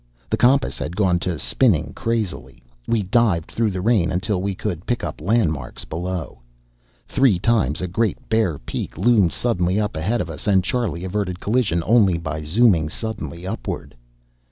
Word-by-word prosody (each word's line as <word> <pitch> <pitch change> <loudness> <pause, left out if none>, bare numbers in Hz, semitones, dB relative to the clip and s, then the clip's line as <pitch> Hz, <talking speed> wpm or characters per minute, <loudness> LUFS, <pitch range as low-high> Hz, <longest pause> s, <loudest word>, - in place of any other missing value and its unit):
The - - +3
compass 130 +3 +3
had 85 - -4
gone 95 -4 +2
to 85 -1 -2
spinning 80 - +1
crazily; 105 - -3 0.2
we 115 -3 +1
dived 95 -4 +1
through 115 -1 +1
the 95 -2 -3
rain 105 -4 +2
until 95 +1 -1
we 100 0 -2
could 90 -4 -4
pick 120 - -1
up 80 -3 -5
landmarks 80 - 0
below. 90 +1 -4 0.7
Three 130 -8 +3
times 85 - +1
a 90 - -2
great 105 +3 0
bare 110 -9 +1
peak - - -6
loomed 110 -8 +4
suddenly 95 -5 0
up 105 -4 -1
ahead 100 +10 0
of - - -2
us, - - -8
and 95 -3 +4
Charlie 95 -6 -2
averted 95 -1 -2
collision 105 -7 +1
only 105 -6 +4
by 80 -2 -4
zooming 85 -1 +3
suddenly 105 -3 -5
upward. 95 -9 -5
95 Hz, 165 wpm, -22 LUFS, 85-115 Hz, 0.7 s, loomed